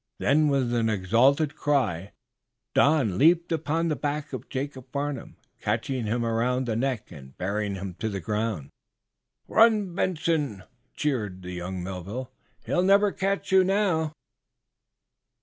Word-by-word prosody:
Then, 150 +2 +3
with 135 -4 +1
an 115 -2 +2
exultant 120 - +3
cry, 105 - 0 0.6
Don 135 - +3
leaped 170 +3 +4
upon 165 +1 0
the 155 - 0
back 145 +1 -3
of - - -6
Jacob 130 -1 -5
Farnum, 140 -3 -4 0.2
catching 130 -5 -1
him 120 +2 0
around 120 +3 0
the 115 -2 -1
neck 125 -1 -2
and 65 -5 -12
bearing 100 +2 -2
him 95 -1 -5
to 110 - -1
the 100 -2 -3
ground. 105 -5 -2 0.8
"Run, 215 -5 +4
Benson!" 160 - -1 0.3
cheered 105 -11 -2
young 90 0 -5
Melville, 95 +7 -6 0.3
"He'll 175 - +1
never 200 +2 +4
catch 195 +1 -2
you 190 0 +6
now!" 185 -5 +1
130 Hz, 130 wpm, -26 LUFS, 105-155 Hz, 0.8 s, you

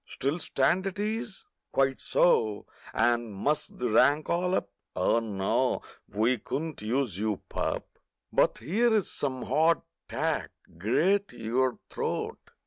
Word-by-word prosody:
Still 140 +6 -1
stand 175 +6 +1
at 195 - -4
ease? 215 0 -3 0.3
Quite 135 -1 +1
so—and 120 -2 +1
muss 145 +10 0
the 125 - -4
rank 145 +7 +4
all 180 +2 +1
up— 100 - -2 0.2
Oh 90 +5 +3
no, 100 -4 0 0.3
we 115 +4 +1
couldn't 155 +5 -4
use 115 -3 -1
you, 105 -2 -1
pup! - - -2 0.5
But - - +3
here's 215 - +2
some 130 -3 -2
"hard 160 +5 +3 0.3
tack." - - -1 0.3
Grate 190 - +2
your 125 +3 0
throat! - - -3
135 Hz, 125 wpm, -28 LUFS, 115-175 Hz, 0.5 s, rank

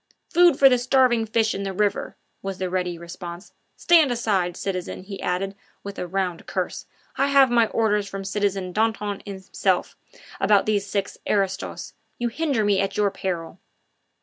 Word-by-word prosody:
"Food 345 -4 +6
for 275 - +8
the 250 -2 +4
starving 245 -2 +3
fish 220 0 +1
in 195 - -4
the 195 -1 -3
river," 205 +1 -1 0.2
was 195 -1 -4
the 185 -1 -3
ready 180 -2 -1
response. 175 +2 -9 0.2
"Stand 330 -5 +5
aside, 195 -7 0
citizen," 185 -1 -4
he 195 0 -8
added, 195 +2 -1 0.3
with 200 0 -7
a 180 - -3
round 180 -1 -2
curse; - - -3 0.3
"I 275 - +3
have 275 -2 +5
my 235 -2 +4
orders 210 -3 +1
from 195 0 -6
citizen 195 -2 -1
Danton 210 -2 0
himself 190 -1 -1 0.4
about 200 0 +4
these 205 -2 0
six 200 0 -3
aristos. 195 -2 -1 0.2
You 240 0 -1
hinder 270 -4 0
me 200 -2 +3
at 195 - -2
your 205 -1 +2
peril." 180 -3 -4
200 Hz, 165 wpm, -24 LUFS, 190-225 Hz, 0.4 s, for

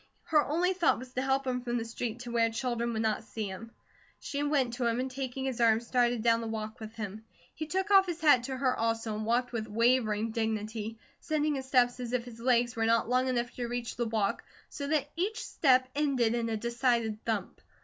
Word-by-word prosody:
Her 305 -2 +3
only 350 +5 +1
thought 355 -3 +2
was 255 +1 -9
to 255 - -1
help 270 0 +1
him 250 -1 -1
from 240 0 -2
the 230 - -2
street, 230 +1 -4
to 245 -1 -7
where 230 -1 +3
children 235 0 -2
would 220 -1 -1
not 220 0 0
see 220 -1 -5
him. 195 +4 -7 0.5
She 285 - -4
went 285 -5 +1
to 240 -1 0
him 235 +1 0
and 260 +1 -2
taking 265 0 -4
his 255 -3 -2
arm 225 -1 +5
started 240 -1 +1
down 230 -1 +3
the 230 - -4
walk 220 +1 -5
with 220 0 -9
him. 215 -1 -6 0.3
He 310 - -5
took 380 +4 -1
off 385 -1 +7
his 345 -2 -3
hat 295 -6 +6
to 265 0 -4
her 255 -1 +1
also, 225 -1 -1
and 215 0 -4
walked 245 +2 +1
with 225 -2 -3
wavering 225 -1 +2
dignity, 220 0 -3 0.2
setting 305 -1 0
his 265 -2 -4
steps 250 -2 +3
as 245 -1 -5
if 245 -1 0
his 235 -2 -11
legs 240 -1 +2
were 225 -1 +1
not 230 0 +2
long 255 +1 +2
enough 240 -1 0
to 245 -1 -4
reach 240 0 -4
the 240 -1 -1
walk, 215 -3 0 0.3
so 280 - -5
that 295 -1 +1
each 400 +7 -2
step 255 -3 +3
ended 270 -6 +1
with 235 -1 -1
a 220 - -1
decided 235 -1 0
thump. 215 -4 -3
240 Hz, 230 wpm, -30 LUFS, 225-260 Hz, 0.5 s, off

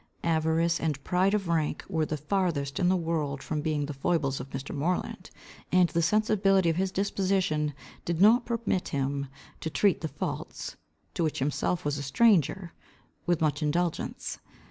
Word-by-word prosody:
Avarice 165 +1 +2
and 150 -4 -2
pride 190 +3 +2
of 195 -3 -2
rank 160 -3 0
were 160 -5 0
the 155 - -2
farthest 150 -3 -1
in 180 - +3
the 185 - +4
world 155 -5 -2
from 155 -2 -2
being 150 -2 -1
the 145 - -5
foibles 140 -1 0
of 135 - -7
Mr. 135 +1 -6
Moreland, 170 +6 -2 0.4
and 180 -2 +5
the 170 - +1
sensibility 195 -1 +3
of - - -3
his 190 +1 0
disposition 185 -7 0 0.3
did 170 -1 -2
not 225 +5 +6
permit 230 -6 -1
him 140 0 -2 0.3
to 160 - -3
treat 200 +4 +2
the 160 - -1
faults, - - -5 0.4
to 170 - -1
which 155 - -1
himself 150 +5 -1
was 145 0 -1
a - - -4
stranger, 175 - +2 0.5
with 175 -2 +2
much 150 -2 +1
indulgence. 165 +3 -1
165 Hz, 165 wpm, -28 LUFS, 150-185 Hz, 0.5 s, not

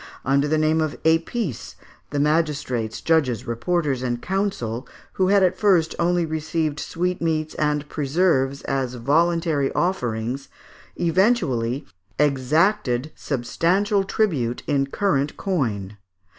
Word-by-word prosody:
Under 140 +2 +2
the 155 +1 +1
name 155 +1 +2
of 155 -2 -2
épices, 165 - 0 0.3
the 145 - -2
magistrates, 150 -7 0
judges, 145 -9 +1
reporters, 140 +3 -1
and 120 -2 -2
counsel, 145 - -2 0.3
who 185 - +1
had 200 0 +4
at 185 0 +3
first 185 -6 +3
only 175 0 +2
received 160 -1 -2
sweetmeats 165 -3 -1
and 150 -1 -1
preserves 140 -2 +1
as 130 -2 -2
voluntary 155 +2 +1
offerings, 125 -7 -1 0.5
eventually 165 - +1 0.3
exacted 150 - +1
substantial 180 - 0
tribute 155 - 0
in 135 -1 +1
current 145 -3 0
coin. 110 - -2
150 Hz, 110 wpm, -23 LUFS, 130-175 Hz, 0.5 s, had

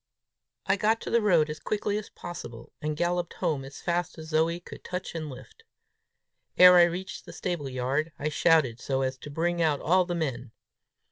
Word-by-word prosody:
I 195 +1 +2
got 220 +3 +2
to - - -5
the 235 - +4
road 175 -7 +4
as 150 -1 -6
quickly 205 +2 -2
as 215 - -10
possible, 115 -9 -9
and 150 0 -2
galloped 175 +1 -1
home 145 -4 -1
as 135 +1 -10
fast 175 -1 -1
as 160 0 -9
Zoe 165 +2 +1
could 175 - -12
touch 180 0 -5
and 160 -2 -4
lift. 130 -3 -12 0.9
Ere 180 0 +9
I 175 - +8
reached 180 +2 -5
the - - -9
stable 170 -7 -3
yard, 135 +5 -1
I 150 - -2
shouted 150 -6 +3
so 135 +1 -1
as 130 0 -1
to 145 - -10
bring 170 +3 -1
out 155 -4 +2
all 180 +3 +3
the 175 0 -3
men. 130 -8 -3
160 Hz, 195 wpm, -27 LUFS, 140-175 Hz, 0.9 s, Ere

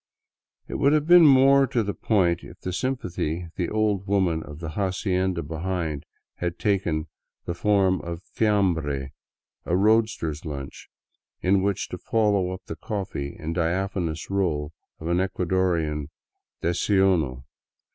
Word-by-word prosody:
It - - -4
would 140 +2 +4
have 150 -1 +2
been 175 -1 +8
more 135 0 +6
to 120 -2 0
the 100 0 -2
point 90 -6 +1
if - - -12
the 90 - -4
sympathy 90 - -2
the 90 - -1
old 105 -3 0
woman 95 -5 +1
of 75 -2 -9
the 80 -1 -6
hacienda 95 -1 -1
behind 80 -1 -3 0.3
had 85 -1 -3
taken 90 -7 0 0.4
the 85 - -2
form 95 0 +2
of 85 +1 -6
fiamhre, 80 -11 +1 0.5
a 90 - 0
roadster's 105 -7 +2
lunch, 70 -3 -7 0.5
with 95 +2 +4
which 95 0 0
to - - -6
follow 105 -5 +1
up 95 0 -6
the 80 - -6
coffee 90 -8 -4
and 80 +1 -3
diaphanous 85 0 -2
roll 80 -6 -1 0.3
of 80 - -6
an 85 +1 +2
Ecuadorian 90 -5 0 0.5
desayuno. 85 -6 +2
90 Hz, 135 wpm, -25 LUFS, 80-100 Hz, 0.5 s, been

